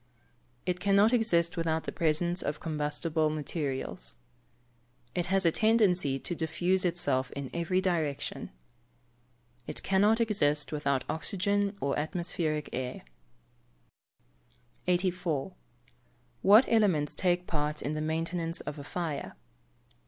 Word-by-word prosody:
It 180 0 -1
cannot 200 +4 +4
exist 175 -8 +2
without 160 -1 0
the - - -4
presence 170 +2 +1
of 145 - -3
combustible 155 0 -1
materials. 150 -3 -3 1.0
It 175 0 -1
has 190 0 +2
a 165 - +5
tendency 190 -10 +3
to 175 - -4
diffuse 175 +3 0
itself 135 -7 +1
in 140 -2 -5
every 170 +2 0
direction. 160 -7 -2 1.2
It - - -4
cannot 205 +4 +3
exist 150 -10 +1
without 140 -3 0
oxygen 200 +5 -1
or 140 +1 0
atmospheric 155 -2 -2
air. 125 0 -4 1.8
84. 180 -3 0 0.9
_What 215 +6 +8
elements 190 -10 +2
take 180 -1 +1
part 150 -2 -2
in 145 - -2
the 155 - -2
maintenance 165 +2 -1
of 150 - -6
a - - -7
fire? 160 -1 -4
170 Hz, 115 wpm, -30 LUFS, 150-185 Hz, 1.8 s, What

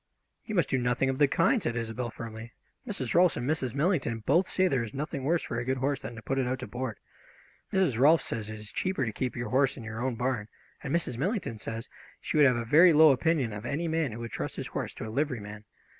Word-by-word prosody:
"You 215 - -4
must 175 -5 +3
do 130 - +2
nothing 125 +2 +1
of 130 - -5
the 145 - +6
kind!" 245 - +2
said 115 - -2
Isobel 115 +1 -3
firmly. 115 0 -8 0.3
"Mrs. 140 - -3
Rolfs 175 0 +4
and 120 - -3
Mrs. 135 -5 -1
Millington 140 - 0
both 170 +7 +3
say 185 0 +2
there 135 -8 +1
is 110 +1 -8
nothing 140 -1 -4
worse 165 +4 +1
for 115 - -3
a - - -2
good 130 +1 -1
horse 135 +1 0
than 115 +2 -7
to 115 - -10
put 135 0 -1
it 130 - 0
out 130 +1 -1
to 125 - -5
board. 125 -2 -4 0.7
Mrs. 180 -12 +2
Rolfs 155 +5 +5
says 110 -2 -4
it 110 - -5
is 110 - -9
much - - -24
cheaper 185 -8 -1
to 110 - -3
keep 125 +3 -3
your 120 0 -4
horse 135 +2 +2
in 120 - -8
your 110 +1 -6
own 130 -2 -1
bam, 125 -3 -1 0.3
and 135 - -5
Mrs. 125 -8 -1
Millington 180 - -2
says 115 +2 -5 0.3
she - - -4
would 150 -2 +7
have 125 -2 +2
a 115 - -3
very 165 +8 +7
low 155 0 +8
opinion 140 -4 +1
of 105 +1 -6
any 145 +8 -2
man 160 -4 0
who 110 - -7
would 115 - -6
trust - - -4
his - - -4
horse - - -4
to - - -6
a - - -6
liveryman. 110 -6 -3
130 Hz, 260 wpm, -29 LUFS, 115-155 Hz, 0.7 s, low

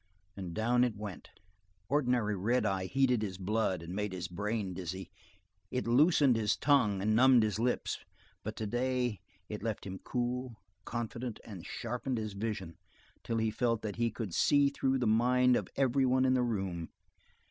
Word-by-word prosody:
and 90 -4 -6
down 120 +3 +3
it 120 -4 0
went. 100 -5 -7 0.6
Ordinarily 125 -6 +1
red 110 +5 +1
eye 95 -2 0
heated 130 -1 +2
his 95 -4 -3
blood 95 -2 0
and 85 +2 -7
made 105 0 -2
his 90 -2 -4
brain 105 +2 -2
dizzy, 95 +1 -6 0.6
it 125 - -2
loosened 140 +1 +5
his 105 -2 +1
tongue 105 -10 +3
and 110 +1 +2
numbed 125 -1 +6
his 110 0 -1
lips, 125 +2 0 0.4
but 110 +1 -5
today 120 0 -1 0.3
it 105 - -6
left 110 -3 -3
him 95 -1 -6
cool, 125 0 -3 0.3
confident, 120 0 -4
and 95 -6 -9
sharpened 125 +2 -3
his 110 -2 -3
vision 100 -5 -4 0.4
until 115 - -3
he 110 -1 +1
felt 115 0 0
that 105 -1 -4
he 115 0 +2
could 110 -5 -5
see 145 - +4
through 135 -1 0
the 125 - 0
minds 125 +3 +4
of - - -7
every 135 0 +2
one 130 +1 +3
in 130 - +4
the 130 - +3
room. 95 -8 -2
115 Hz, 170 wpm, -32 LUFS, 100-125 Hz, 0.6 s, numbed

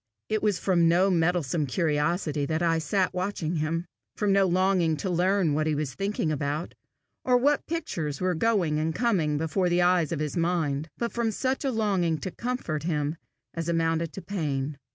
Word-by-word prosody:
It 215 0 0
was 210 -3 +1
from 175 -3 +2
no 185 +3 +4
meddlesome 165 -3 +1
curiosity 150 +1 0
that 160 +2 -1
I 165 -1 +2
sat 185 +5 0
watching 180 -3 -2
him, 160 +3 -1 0.3
from 205 -2 +1
no 195 -1 +4
longing 180 -3 +2
to 185 +4 -2
learn 180 -2 +2
what 155 +1 0
he 155 - +1
was 145 -2 -2
thinking 195 -5 -1
about, 150 +2 -2 0.5
or 250 -1 +4
what 285 +4 +2
pictures 165 - -3
were 185 0 +1
going 175 -5 +1
and 160 +1 -1
coming 180 -11 +1
before 170 +4 0
the 175 0 +3
eyes 175 -3 +3
of 165 - -1
his 150 -1 -2
mind, 165 -4 0
but 235 -1 -2
from 235 -1 0
such 260 +6 -1
a 275 - +1
longing 195 -8 +1
to 185 - -4
comfort 235 -10 -3
him 150 -1 -1 0.4
as 165 0 -3
amounted 165 -1 0
to 195 - -8
pain. 145 -7 -3
170 Hz, 185 wpm, -27 LUFS, 155-195 Hz, 0.5 s, no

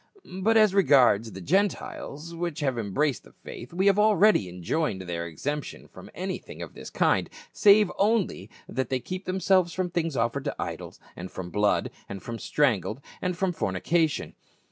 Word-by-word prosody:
But 225 +3 +4
as 215 -3 +5
re 200 - +5
gards 125 - +4
the 95 0 -8
Gentiles, 170 - -1
which 170 -2 -4
have 135 -4 0
embraced 120 +5 0
the - - -18
faith, 120 - -10
we 185 +3 0
have 200 0 +4
already 210 - +4
enjoined 95 - -2
their 85 -1 -4
exemption 145 - -5
from - - -13
anything - - -5
of - - -10
this - - -9
kind, - - +1 0.2
save 205 -1 +5
only 200 - +1 0.2
that 130 -1 -3
they 130 - 0
keep 185 +8 -6
themselves 185 -2 +2
from 185 -1 -2
things 165 -5 -1
offered 115 +4 -1
to - - -2
idols, - - -6 0.2
and 90 +2 -7
from 90 -1 -7
blood, 105 0 +1 0.2
and 100 -1 -7
from 115 -1 -6
strangled, 125 - 0 0.2
and 180 -1 -2
from 185 -1 0
fornication." 155 - 0
150 Hz, 170 wpm, -27 LUFS, -, 0.2 s, as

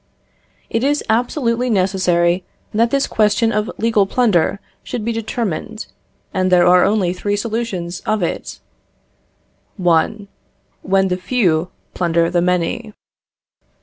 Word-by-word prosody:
It 230 - -1
is 290 +2 +1
absolutely 245 +1 0
necessary 185 -3 +1 0.3
that 230 +2 +2
this 275 +2 +1
question 220 +1 +2
of 210 -1 -1
legal 220 -3 +2
plunder 200 -6 +1 0.2
should 230 -4 -5
be 235 - 0
determined, 225 -2 -4 0.5
and 185 -2 0
there 175 -1 +5
are 180 0 +6
only 200 -4 +1
three 205 +2 -2
solutions 205 -5 -3
of 215 -3 -1
it: 170 - -4 1.2
1. 185 +3 +1 0.5
When 190 0 +2
the 180 - 0
few 180 -5 +1 0.2
plunder 170 -1 +1
the 175 -1 +2
many. 180 +6 -1
205 Hz, 120 wpm, -18 LUFS, 180-230 Hz, 1.2 s, are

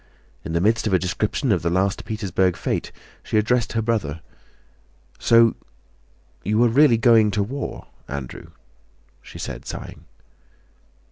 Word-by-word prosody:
In 80 - -5
the 85 - +1
midst 110 +3 +2
of 100 - 0
a - - +6
description 105 - -1
of 90 -5 +2
the 85 - 0
last 95 +3 0
Petersburg 95 -5 0
fete - - -3 0.3
she - - -2
addressed 120 +2 +1
her 115 -1 0
brother: 95 -10 -2 1.0
"So 115 -1 +5 0.9
you 105 +3 +2
are 120 - +4
really 125 0 +5
going 115 -2 +5
to 105 0 0
the 105 +6 -4
war, 140 - -5 0.2
Andrew?" 65 -3 -7 0.7
she - - -12
said - - -6
sighing. 75 - -8
105 Hz, 145 wpm, -22 LUFS, 90-115 Hz, 1.0 s, a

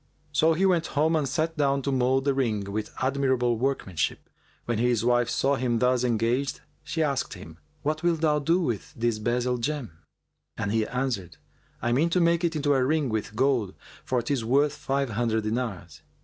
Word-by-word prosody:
So 160 +1 +3
he 185 +4 +1
went 175 -4 +2
home 160 +3 +3
and 145 -4 0
sat 160 +4 -1
down 140 -2 +1
to 140 - -1
mould 130 +1 +2
the 140 - +3
ring 115 -7 0
with 105 +1 -3
admirable 130 -3 +1
workmanship. 120 - -2 0.3
When 120 -2 -1
his 120 -2 +1
wife 120 -1 +3
saw 140 +2 +1
him 120 -3 0
thus 125 +1 +2
engaged, 120 +3 0 0.2
she 160 0 -1
asked 140 -3 -1
him, 80 +1 -12 0.2
"What 155 +1 -1
wilt 170 -2 +1
thou 150 -2 +3
do 165 +5 +2
with 120 - -3
this 115 -1 0
bezel 125 +2 0
gem?"; 140 - -3 0.7
and 100 - -2
he 110 0 +1
answered, 125 -9 -3 0.5
"I 120 - +1
mean 145 +8 +3
to 180 - +2
make 170 0 +3
it 170 -1 0
into 145 -1 +2
a 130 -2 +2
ring 150 0 +1
with 110 -1 -3
gold, 125 -6 +1 0.3
for 125 -2 -1
'tis 125 -1 -1
worth 140 +5 +2
five 135 -3 -1
hundred 110 0 0
dinars." 105 - -4
130 Hz, 190 wpm, -26 LUFS, 115-145 Hz, 0.7 s, So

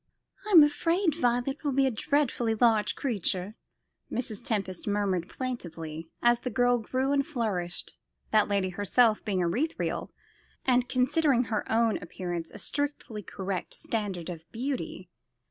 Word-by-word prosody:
"I'm 350 -7 +9
afraid 330 +4 +2
Violet 245 -2 0
will 285 -2 0
be 270 +1 +4
a 265 - +2
dreadfully 240 -2 +1
large 220 -2 +3
creature," 200 -5 -1 0.6
Mrs. 240 -4 -3
Tempest 195 -5 -2
murmured 200 -4 0
plaintively, 165 -10 -5
as 240 0 +5
the 250 - -3
girl 245 0 +3
grew 260 +4 -1
and 280 -1 +3
flourished; 215 - -3 0.3
that 215 -1 +4
lady 200 -2 +1
herself 215 +4 +3
being 195 -4 0
ethereal, 245 - -1 0.5
and 250 -1 +3
considering 260 0 +3
her 220 -3 -3
own 225 0 +3
appearance 175 -1 -5
a - - -11
strictly 285 -7 -3
correct 190 -1 -4
standard 195 -6 -3
of 165 -1 -10
beauty. 255 +3 -4
230 Hz, 135 wpm, -28 LUFS, 190-260 Hz, 0.6 s, I'm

